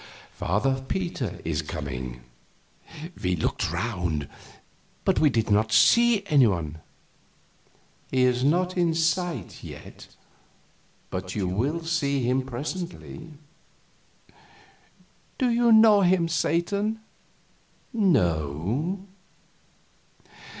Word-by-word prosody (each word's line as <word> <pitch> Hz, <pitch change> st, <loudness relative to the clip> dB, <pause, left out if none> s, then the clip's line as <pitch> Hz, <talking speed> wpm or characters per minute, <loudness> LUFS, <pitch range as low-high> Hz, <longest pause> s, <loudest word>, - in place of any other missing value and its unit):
Father 130 Hz, +8 st, 0 dB
Peter 170 Hz, -, -3 dB
is 80 Hz, -1 st, -1 dB
coming." 65 Hz, -6 st, -6 dB, 1.0 s
We 90 Hz, 0 st, +1 dB
looked 80 Hz, -, -1 dB
around, 90 Hz, -9 st, -2 dB, 0.8 s
but -, -, +2 dB
did 115 Hz, -3 st, 0 dB
not 110 Hz, +2 st, +2 dB
see 230 Hz, -, +5 dB
any 145 Hz, -9 st, +5 dB
one. 80 Hz, -6 st, -2 dB, 1.3 s
"He 130 Hz, -1 st, +2 dB
is 125 Hz, 0 st, +2 dB
not 180 Hz, +6 st, +1 dB
in 170 Hz, -3 st, +1 dB
sight 165 Hz, -, -1 dB
yet, -, -, -11 dB, 1.0 s
but 95 Hz, 0 st, -5 dB
you 100 Hz, -3 st, -1 dB
will 135 Hz, -, -1 dB
see 140 Hz, -5 st, 0 dB
him 125 Hz, +2 st, +1 dB
presently." 160 Hz, +4 st, -6 dB, 2.0 s
"Do 255 Hz, -3 st, +1 dB
you 235 Hz, 0 st, +3 dB
know 220 Hz, -2 st, +7 dB
him, 180 Hz, -2 st, +3 dB
Satan?" 200 Hz, +7 st, 0 dB, 0.9 s
"No." 125 Hz, -, 0 dB
135 Hz, 90 wpm, -25 LUFS, -, 2.0 s, know